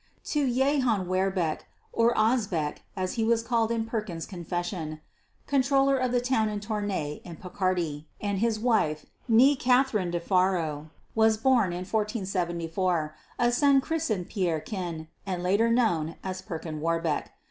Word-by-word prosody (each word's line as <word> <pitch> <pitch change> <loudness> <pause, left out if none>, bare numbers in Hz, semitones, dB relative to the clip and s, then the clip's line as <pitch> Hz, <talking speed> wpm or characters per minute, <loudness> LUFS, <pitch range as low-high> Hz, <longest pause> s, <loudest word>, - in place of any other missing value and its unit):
To 285 -4 +2
Jehan 255 -6 +2
Werbecque 185 -3 0 0.3
(or 230 +1 +3
Osbeck 210 -9 +1 0.2
as 185 -1 -1
he - - +2
was 230 0 +2
called 230 -2 +1
in 230 -1 -1
Perkin's 210 -8 -4
"confession"), 175 -3 -4 0.5
Controller 275 0 +3
of 255 -2 0
the 245 - +3
town 240 -3 +1
of 210 -1 -3
Tournay 205 -8 -3
in 170 - -8
Picardy, 175 -4 -2
and 200 -2 -1
his 225 0 +1
wife, 215 -11 +1 0.2
née 260 +5 +6
Katherine 250 -7 +2
de 175 0 -1
Faro, 170 -5 0 0.2
was 220 0 +4
born 230 -5 +3
in 175 +1 -4
1474, 180 -6 -1 0.2
a 240 0 +3
son 275 +2 +4
christened 265 - -2
Pierrequin 175 -3 -3 0.2
and 180 -2 -2
later 200 +6 +3
known 175 -10 +1
as 185 0 -4
Perkin 160 -3 -6
Warbeck. 165 -1 0
200 Hz, 140 wpm, -27 LUFS, 175-235 Hz, 0.5 s, née